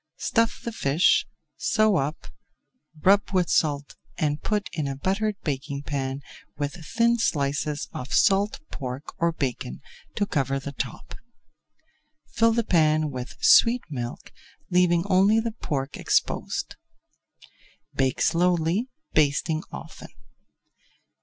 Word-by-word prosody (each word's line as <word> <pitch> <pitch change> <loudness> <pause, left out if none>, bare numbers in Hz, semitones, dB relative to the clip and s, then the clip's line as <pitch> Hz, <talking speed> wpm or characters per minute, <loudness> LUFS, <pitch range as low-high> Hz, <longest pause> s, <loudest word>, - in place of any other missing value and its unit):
Stuff 230 -1 0
the 235 - -3
fish, 160 -5 +3 0.3
sew 215 -2 +2
up, 150 +3 -2 0.8
rub 200 +2 +4
with 180 -2 +2
salt 145 -2 0 0.2
and 150 -1 0
put 210 -2 -1
in 150 -3 -2
a 135 - -3
buttered 200 +8 -1
baking 140 -1 -3
pan 135 -1 -3 0.3
with 145 0 -2
thin 235 +6 +2
slices 145 -4 -1
of 125 - -6
salt 205 -1 +3
pork 130 +1 -6
or 170 0 +2
bacon 125 - -4 0.4
to 205 - +1
cover 135 -6 0
the 140 +1 -6
top. 135 -3 -6 1.2
Fill 230 +1 +3
the 235 0 +1
pan 155 -5 +2
with 125 -1 -7
sweet 240 +1 +6
milk, 120 -3 -6 0.4
leaving 175 -1 +3
only 200 +3 +4
the 230 0 -2
pork 140 -9 -4
exposed. - - -1 1.2
Bake 130 -1 0
slowly, 175 +6 +2 0.2
basting 155 +1 +2
often. 65 - -9
155 Hz, 120 wpm, -25 LUFS, 140-200 Hz, 1.2 s, sweet